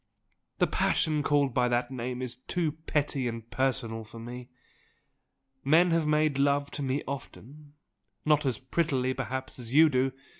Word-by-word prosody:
The -, -, +4 dB
passion 155 Hz, -1 st, +1 dB
called 145 Hz, -3 st, +2 dB
by 125 Hz, 0 st, +2 dB
that 120 Hz, +1 st, 0 dB
name 125 Hz, 0 st, -4 dB
is 125 Hz, -1 st, -4 dB
too 160 Hz, +4 st, -1 dB
petty 150 Hz, -4 st, -1 dB
and 115 Hz, -1 st, -5 dB
personal 115 Hz, -4 st, 0 dB
for 115 Hz, +1 st, -12 dB
me. 120 Hz, +2 st, -8 dB, 1.1 s
Men 165 Hz, +5 st, +5 dB
have 165 Hz, -2 st, +2 dB
made 150 Hz, -2 st, +2 dB
love 140 Hz, 0 st, +2 dB
to 145 Hz, -, -5 dB
me 135 Hz, +1 st, -1 dB
often 140 Hz, +1 st, -8 dB, 0.5 s
not 150 Hz, -1 st, +4 dB
as 130 Hz, -5 st, 0 dB
prettily 130 Hz, -2 st, 0 dB
perhaps 130 Hz, 0 st, -5 dB
as 120 Hz, +2 st, -5 dB
you 160 Hz, +1 st, +8 dB
do! 130 Hz, -1 st, +1 dB
135 Hz, 155 wpm, -29 LUFS, 125-150 Hz, 1.1 s, you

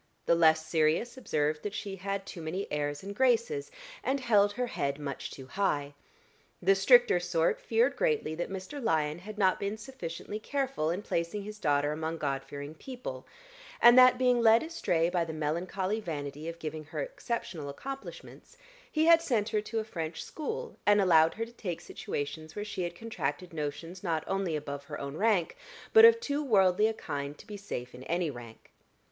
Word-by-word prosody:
The -, -, +4 dB
less 160 Hz, -1 st, +4 dB
serious 160 Hz, +9 st, +1 dB
observed 150 Hz, -, -1 dB
that 205 Hz, -1 st, -5 dB
she 195 Hz, -2 st, -5 dB
had 195 Hz, +1 st, -3 dB
too 175 Hz, -, -8 dB
many 170 Hz, +5 st, -3 dB
airs 145 Hz, +1 st, -2 dB
and 200 Hz, +1 st, -6 dB
graces 260 Hz, -, +2 dB, 0.3 s
and 270 Hz, +2 st, 0 dB
held 205 Hz, -5 st, +3 dB
her 250 Hz, +3 st, -1 dB
head 140 Hz, -11 st, -2 dB
much 140 Hz, -2 st, -5 dB
too 135 Hz, -, -10 dB
high; 145 Hz, -3 st, -1 dB, 0.7 s
the 195 Hz, +2 st, +4 dB
stricter 220 Hz, 0 st, +5 dB
sort 170 Hz, -2 st, 0 dB
feared 240 Hz, +5 st, +2 dB
greatly 460 Hz, -, 0 dB
that 170 Hz, +2 st, -3 dB
Mr. 195 Hz, +9 st, -6 dB
Lyon 155 Hz, -5 st, +1 dB
had 210 Hz, +4 st, -9 dB
not 190 Hz, -3 st, +3 dB
been 200 Hz, +2 st, -2 dB
sufficiently 210 Hz, -3 st, -6 dB
careful 270 Hz, -, -1 dB
in 180 Hz, +5 st, -2 dB
placing 170 Hz, +4 st, -2 dB
his 210 Hz, +1 st, -8 dB
daughter 145 Hz, -3 st, +2 dB
among 160 Hz, +2 st, -3 dB
God 135 Hz, -3 st, -2 dB
fearing 145 Hz, +2 st, -7 dB
people, 250 Hz, +9 st, -8 dB, 0.5 s
and 240 Hz, 0 st, +8 dB
that, 255 Hz, 0 st, +8 dB
being 250 Hz, -1 st, +3 dB
led 225 Hz, +2 st, +6 dB
astray 315 Hz, -, 0 dB
by 175 Hz, -1 st, +1 dB
the 165 Hz, -1 st, -5 dB
melancholy 180 Hz, +7 st, -2 dB
vanity 150 Hz, -4 st, -5 dB
of 165 Hz, -, -7 dB
giving 155 Hz, -1 st, -6 dB
her -, -, -6 dB
exceptional 235 Hz, -, -4 dB
accomplishments, 270 Hz, -, -9 dB, 0.3 s
he 310 Hz, 0 st, +2 dB
had 335 Hz, 0 st, +7 dB
sent 230 Hz, -10 st, 0 dB
her 215 Hz, -2 st, 0 dB
to 225 Hz, +2 st, -5 dB
a 220 Hz, -, +1 dB
French 165 Hz, -6 st, -5 dB
school, 460 Hz, +9 st, -5 dB
and 205 Hz, 0 st, +5 dB
allowed 165 Hz, -4 st, +5 dB
her 225 Hz, -, -2 dB
to 230 Hz, -, -14 dB
take 180 Hz, -8 st, -4 dB
situations 155 Hz, +2 st, -5 dB
where 205 Hz, -, -4 dB
she 205 Hz, -3 st, -4 dB
had 175 Hz, -1 st, -3 dB
contracted 195 Hz, -5 st, -4 dB
notions 155 Hz, +4 st, -5 dB
not 165 Hz, -5 st, -1 dB
only 195 Hz, -4 st, -1 dB
above 140 Hz, -1 st, -5 dB
her -, -, -6 dB
own 140 Hz, +1 st, -5 dB
rank, 200 Hz, -2 st, +2 dB, 0.4 s
but 450 Hz, 0 st, +10 dB
of 460 Hz, 0 st, +7 dB
too 295 Hz, -8 st, -2 dB
worldly 205 Hz, -4 st, +4 dB
a 225 Hz, -, -1 dB
kind 140 Hz, -3 st, -5 dB
to -, -, -14 dB
be 210 Hz, -, -8 dB
safe 125 Hz, -11 st, -6 dB
in 125 Hz, -, -10 dB
any 170 Hz, -2 st, 0 dB
rank. 120 Hz, -3 st, -12 dB
185 Hz, 190 wpm, -30 LUFS, 155-225 Hz, 0.7 s, but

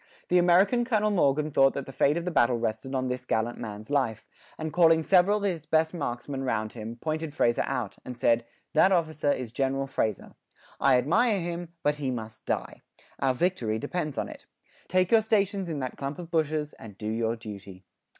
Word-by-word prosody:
The 180 Hz, -, +5 dB
American 190 Hz, +7 st, +4 dB
Colonel 215 Hz, -3 st, +1 dB
Morgan 150 Hz, -4 st, +2 dB
thought 135 Hz, -1 st, +4 dB
that 140 Hz, -, -3 dB
the -, -, -9 dB
fate 140 Hz, +4 st, +2 dB
of 170 Hz, -, -3 dB
the 180 Hz, -, -1 dB
battle 120 Hz, -5 st, +3 dB
rested 115 Hz, +3 st, -3 dB
on 130 Hz, 0 st, 0 dB
this 125 Hz, 0 st, -3 dB
gallant 120 Hz, -1 st, -1 dB
man's 110 Hz, +1 st, -7 dB
life, 130 Hz, -7 st, 0 dB, 0.3 s
and 160 Hz, -1 st, -4 dB
calling 165 Hz, -2 st, +5 dB
several 190 Hz, +4 st, +4 dB
of 205 Hz, -, -5 dB
his 170 Hz, -6 st, -2 dB
best 160 Hz, +1 st, +2 dB
marksman 135 Hz, -3 st, -4 dB
round 110 Hz, -4 st, -1 dB
him, 115 Hz, 0 st, -7 dB
pointed 155 Hz, +3 st, -4 dB
Fraser 120 Hz, -6 st, +2 dB
out, 115 Hz, -6 st, -3 dB
and 125 Hz, -1 st, -7 dB
said: 115 Hz, 0 st, +3 dB, 0.3 s
"That 175 Hz, +5 st, +5 dB
officer 155 Hz, -5 st, +1 dB
is 125 Hz, -5 st, -3 dB
General 135 Hz, +2 st, 0 dB
Fraser; 110 Hz, -6 st, -2 dB, 0.5 s
I 135 Hz, -2 st, +5 dB
admire 205 Hz, -, +2 dB
him, 175 Hz, 0 st, -4 dB
but 150 Hz, 0 st, +1 dB
he 140 Hz, -3 st, -2 dB
must 110 Hz, -3 st, -6 dB
die. -, -, -3 dB, 0.4 s
Our 130 Hz, -1 st, +1 dB
victory 125 Hz, -9 st, 0 dB
depends 150 Hz, +4 st, -3 dB
on -, -, -1 dB
it. -, -, -12 dB, 0.4 s
Take 185 Hz, 0 st, +2 dB
your 225 Hz, -1 st, +6 dB
stations 200 Hz, -3 st, 0 dB
in 160 Hz, -, -3 dB
that 130 Hz, -, -5 dB
clump 140 Hz, +1 st, -4 dB
of 175 Hz, -1 st, -9 dB
bushes, 155 Hz, -2 st, 0 dB
and 105 Hz, -3 st, -11 dB
do 105 Hz, -, -5 dB
your 115 Hz, +1 st, 0 dB
duty." 100 Hz, -4 st, -10 dB
140 Hz, 200 wpm, -27 LUFS, 120-175 Hz, 0.5 s, your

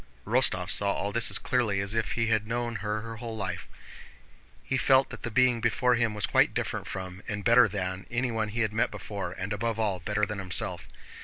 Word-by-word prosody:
Rostóv -, -, +2 dB
saw 100 Hz, -1 st, +2 dB
all 100 Hz, -, -2 dB
this 115 Hz, +2 st, +5 dB
as -, -, +3 dB
clearly 115 Hz, -6 st, 0 dB
as 100 Hz, +2 st, -1 dB
if 115 Hz, -1 st, -1 dB
he 115 Hz, -, 0 dB
had 110 Hz, -1 st, +1 dB
known 120 Hz, 0 st, -2 dB
her 110 Hz, +2 st, -4 dB
whole 115 Hz, -1 st, -6 dB
life. 100 Hz, -3 st, -4 dB, 1.0 s
He -, -, -2 dB
felt 130 Hz, +1 st, +3 dB
that -, -, -8 dB
the 115 Hz, -, -4 dB
being 125 Hz, 0 st, +3 dB
before 120 Hz, +2 st, +2 dB
him 115 Hz, -3 st, +1 dB
was 105 Hz, -, 0 dB
quite -, -, +3 dB
different -, -, -3 dB
from, 95 Hz, 0 st, -6 dB
and 105 Hz, -2 st, -4 dB
better 120 Hz, 0 st, +6 dB
than, 95 Hz, -2 st, -4 dB
anyone 120 Hz, -3 st, -1 dB
he 115 Hz, +3 st, -2 dB
had 110 Hz, -2 st, 0 dB
met 110 Hz, -, +1 dB
before, 100 Hz, -3 st, -6 dB
and 95 Hz, +3 st, -4 dB
above 115 Hz, +2 st, -2 dB
all 105 Hz, -4 st, 0 dB
better 105 Hz, +4 st, 0 dB
than 105 Hz, -1 st, -5 dB
himself. 95 Hz, -2 st, -1 dB
110 Hz, 210 wpm, -28 LUFS, 100-115 Hz, 1.0 s, better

